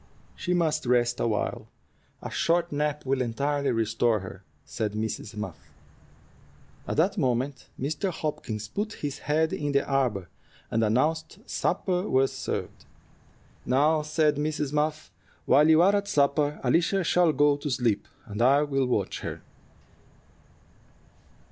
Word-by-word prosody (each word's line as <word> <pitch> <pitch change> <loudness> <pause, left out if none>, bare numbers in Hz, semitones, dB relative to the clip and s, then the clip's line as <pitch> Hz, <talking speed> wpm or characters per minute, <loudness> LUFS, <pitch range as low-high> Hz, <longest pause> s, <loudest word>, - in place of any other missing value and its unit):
"She 180 0 -1
must 155 -5 0
rest 120 -1 +2
awhile. 110 -3 -1 0.6
A - - -5
short 170 +1 +1
nap 150 0 -1
will 135 0 +1
entirely 140 +4 -1
restore 115 -1 +1
her," 95 0 -9 0.2
said 105 -2 -3
Mrs. 110 0 -4
Muff. 105 0 -7 1.2
At - - -3
that 190 +5 +2
moment 130 0 -1
Mr. 150 +8 -1
Hopkins 115 - -4
put 210 - -3
his 145 -1 -5
head 160 +2 +1
in 145 -1 -2
the 140 - +2
arbor, 125 -10 0 0.4
and 115 - +1
announced 150 +9 0
supper 180 +1 -1
was 135 +1 +2
served. - - -5 0.8
"Now," 150 +5 +3
said 150 -1 +1
Mrs. 150 -1 -2
Muff, 150 +1 -1 0.3
"while 150 +2 +5
you 160 +1 +6
are 200 +2 +5
at 200 0 -1
supper 145 -1 +1
Alicia 170 +8 +2
shall 175 -1 +3
go 145 -1 +3
to 145 +1 -4
sleep, 120 -5 0 0.2
and 105 0 -5
I 140 +4 +5
will 135 -3 0
watch 125 - -1
her." - - -6
145 Hz, 135 wpm, -27 LUFS, 120-155 Hz, 1.2 s, you